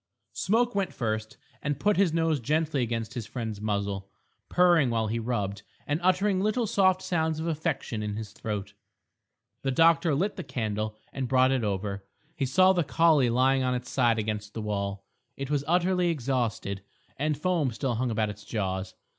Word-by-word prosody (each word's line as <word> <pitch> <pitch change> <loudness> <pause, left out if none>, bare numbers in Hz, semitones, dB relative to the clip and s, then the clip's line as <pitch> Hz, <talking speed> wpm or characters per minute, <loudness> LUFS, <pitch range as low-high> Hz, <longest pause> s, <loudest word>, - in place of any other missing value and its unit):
Smoke 235 +4 +1
went 195 -2 -1
first 110 -2 -3 0.2
and 145 -1 -2
put 210 +6 +3
his 190 -3 +3
nose 165 -2 +1
gently 150 +3 0
against 115 -1 -2
his 115 -3 -5
friend's 110 -4 -5
muzzle, 100 -2 -2 0.4
purring 175 -6 +4
while 115 -1 +1
he 110 +2 -1
rubbed, 105 -4 -2 0.2
and 145 +2 0
uttering 185 +2 +2
little 215 +4 +1
soft 190 -3 +3
sounds 160 -3 0
of 160 - -3
affection 155 -8 -2
in 105 -1 -3
his 110 -1 -6
throat. 105 -2 -4 0.9
The 135 - -1
doctor 165 +2 +4
lit 195 +8 -1
the 185 - -4
candle 110 -4 -3 0.2
and 135 -2 -2
brought 130 +1 +4
it 130 -3 +1
over. 100 -1 -2 0.3
He 135 -4 -1
saw 185 +8 +5
the 175 -2 +2
collie 155 -4 +4
lying 130 +3 +3
on 125 -1 +1
its 125 0 -5
side 120 -4 +3
against 105 -1 -3
the 110 - -3
wall; 100 -1 -3 0.3
it 135 +1 -4
was 145 -2 +1
utterly 180 +1 +2
exhausted, 120 - -1 0.4
and 150 +1 0
foam 170 -4 +1
still 125 +2 -2
hung 120 +2 -1
about 110 -2 0
its 105 0 -12
jaws. 95 -3 -3
130 Hz, 180 wpm, -28 LUFS, 110-165 Hz, 0.9 s, saw